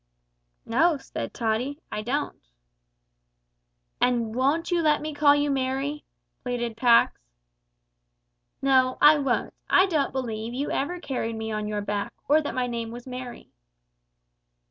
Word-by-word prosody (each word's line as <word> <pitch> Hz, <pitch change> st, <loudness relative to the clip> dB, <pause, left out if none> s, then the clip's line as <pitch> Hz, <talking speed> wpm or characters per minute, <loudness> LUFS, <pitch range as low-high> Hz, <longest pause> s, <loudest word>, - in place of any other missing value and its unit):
"No," 305 Hz, +7 st, +3 dB
said 270 Hz, -, -6 dB
Tottie, 240 Hz, +6 st, -2 dB
"I 210 Hz, -, -3 dB
don't." 275 Hz, +7 st, -3 dB, 1.6 s
"And 235 Hz, -3 st, +1 dB
won't 280 Hz, +8 st, +1 dB
you 345 Hz, -1 st, +2 dB
let 305 Hz, -2 st, +3 dB
me 305 Hz, 0 st, -5 dB
call 290 Hz, 0 st, +5 dB
you 290 Hz, 0 st, +1 dB
Merry?" 270 Hz, +2 st, -2 dB, 0.4 s
pleaded 240 Hz, -2 st, -3 dB
Pax. 235 Hz, -, +4 dB, 1.4 s
"No, 260 Hz, -1 st, +3 dB
I 300 Hz, 0 st, +7 dB
won't. 270 Hz, -3 st, -1 dB, 0.2 s
I 375 Hz, -, +6 dB
don't 315 Hz, -7 st, 0 dB
believe 235 Hz, -3 st, -4 dB
you 280 Hz, +3 st, -2 dB
ever 350 Hz, +6 st, -2 dB
carried 245 Hz, -7 st, -3 dB
me 220 Hz, 0 st, -4 dB
on 215 Hz, -1 st, -2 dB
your 210 Hz, -1 st, -2 dB
back, 205 Hz, 0 st, -3 dB
or 305 Hz, +2 st, +5 dB
that 290 Hz, -, -5 dB
my 255 Hz, -1 st, 0 dB
name 235 Hz, -2 st, -4 dB
was 240 Hz, +1 st, -9 dB
Merry." 250 Hz, -1 st, -8 dB
255 Hz, 140 wpm, -26 LUFS, 230-290 Hz, 1.6 s, I